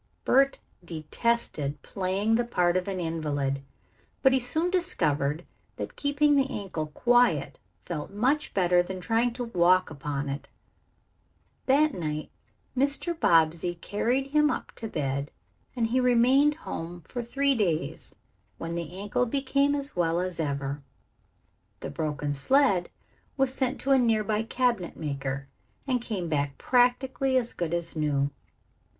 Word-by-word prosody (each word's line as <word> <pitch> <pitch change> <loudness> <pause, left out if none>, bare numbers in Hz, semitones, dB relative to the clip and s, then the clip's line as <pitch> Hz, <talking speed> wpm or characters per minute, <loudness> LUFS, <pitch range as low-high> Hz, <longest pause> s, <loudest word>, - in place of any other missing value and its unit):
Bert 275 +1 +4 0.3
detested 155 -2 -2
playing 195 +3 0
the 240 +2 +3
part 180 -7 +1
of 185 +1 0
an 190 -2 -2
invalid, 145 -5 -1 0.6
but 265 -1 +6
he 265 - +4
soon 315 +8 0
discovered 160 - 0 0.3
that - - -6
keeping 290 +1 +2
the 275 -1 +2
ankle 180 -6 -4
quiet 245 +10 +2 0.2
felt 155 -4 -5
much 260 +10 0
better 180 -2 +4
than 185 +1 -5
trying 230 +5 +1
to 245 +1 -4
walk 185 -6 +3
around 155 - -9
upon 145 0 -3
it. 140 +1 -5 1.2
That 290 +2 +4
night 155 -3 -4 0.4
Mr. 280 +6 +1
Bobbsey 165 - +3
carried 245 +9 -1
him 300 0 +4
up - - -3
to 225 - -4
bed, 140 -6 -2 0.5
and 235 -2 +1
he 240 +3 +1
remained 255 +4 +4
home 175 - -6
for 245 - -5
three 275 +4 +1
days, 185 -10 -1 0.4
when 165 0 -5
the 170 +1 -5
ankle 205 +5 0
became 280 +2 +1
as 280 0 -4
well 170 -1 +1
as 180 -1 -3
ever. 140 -2 -2 1.0
The - - -5
broken 150 -2 -2
sled 195 - +2 0.5
was 265 -1 +2
sent 265 0 0
to 275 - 0
a 270 - +6
nearby 215 -3 +2
cabinet 230 -5 -1
maker, 140 -2 -4 0.4
and 255 -3 0
came 200 -7 -3
back 145 -3 -1
practically 260 +2 +2
as 240 -2 0
good 170 -2 -3
as 170 -1 -2
new. 145 -2 0
200 Hz, 145 wpm, -27 LUFS, 160-260 Hz, 1.2 s, but